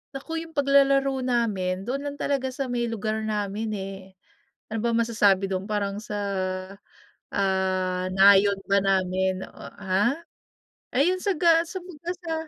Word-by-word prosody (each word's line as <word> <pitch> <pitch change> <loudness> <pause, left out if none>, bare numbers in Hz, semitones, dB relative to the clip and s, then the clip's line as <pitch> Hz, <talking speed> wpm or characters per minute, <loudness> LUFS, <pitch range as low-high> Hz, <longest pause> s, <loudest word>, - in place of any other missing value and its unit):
Naku, 325 +4 -4
'yong 325 0 -10
paglalaro 275 -1 +3
namin 210 -7 0
doon 250 +6 -2
lang 285 - -5
talaga 275 -2 -1
sa 260 0 -4
may 240 -1 0
lugar 220 -1 -2
namin, 210 +1 -2
eh. 195 0 -5 0.7
Ano 225 0 -3
ba 235 - +1
masasabi 210 -4 +2
do'n 190 0 -2
parang 205 -1 -2
sa 210 0 -6 1.2
ah, 185 -1 0
nayon 200 +1 +6
ba 200 - +4
namin, 190 -1 +1
oh - - -12
ha? 200 +6 +1 0.8
Ayun, 345 +9 +3
sa 400 0 +1
ga 330 0 +5
sa 375 +3 -6
'baga 350 -1 -7
sa 335 -2 -4
220 Hz, 145 wpm, -25 LUFS, 195-275 Hz, 1.2 s, nayon